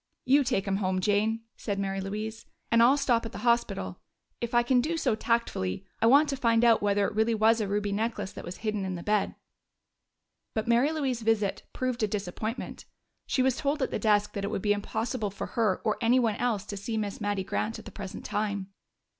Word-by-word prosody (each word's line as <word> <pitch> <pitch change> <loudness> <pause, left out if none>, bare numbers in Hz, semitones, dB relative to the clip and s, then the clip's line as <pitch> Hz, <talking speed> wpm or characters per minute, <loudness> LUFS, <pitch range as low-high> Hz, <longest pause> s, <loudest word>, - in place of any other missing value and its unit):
"You 280 +2 +5
take 195 -6 0
him 195 0 +1
home, 185 -2 0
Jane," 215 +3 +1 0.2
said 205 -3 -3
Mary 195 -1 -2
Louise, 215 +3 -5 0.2
"and 230 0 +5
I'll 255 +4 +6
stop 245 -5 +2
at 225 0 -7
the - - -6
hospital. 235 0 +1 0.4
If 235 0 -3
I 240 - +5
can 250 +1 +3
do 330 +5 -1
so 260 -7 +1
tactfully, 215 - -1 0.2
I 225 - +5
want 285 +5 +6
to 275 - 0
find 230 -2 +3
out 230 -1 +5
whether 200 0 +2
it - - -2
really 220 +2 +2
was 220 +1 +4
a 210 - -1
ruby 205 0 -1
necklace 210 -1 -2
that - - -9
was 175 - -7
hidden 210 -2 0
in 190 -1 -3
the 170 - -6
bed." 210 -1 +1 1.2
But 220 +1 -1
Mary 240 +6 +4
Louise's 270 -7 -1
visit 220 -3 +1
proved 255 -2 -2
a 215 - +3
disappointment; 210 +4 -4 0.4
she 255 - +2
was 265 -1 +2
told 285 0 0
at - - -2
the - - -1
desk 210 -2 +2
that 200 - -4
it 200 - -1
would 200 - -3
be 205 -1 +4
impossible 220 +2 -2
for 195 - -5
her 220 -6 +2
or 215 - +1
anyone 235 -2 +3
else 220 -5 0
to 205 - -6
see 220 +3 -3
Miss 205 -1 -3
Mattie 205 -2 -1
Grant 215 +4 -2
at 220 - -11
the - - -9
present 195 -3 -7
time. 200 -2 -2
220 Hz, 220 wpm, -28 LUFS, 205-235 Hz, 1.2 s, I'll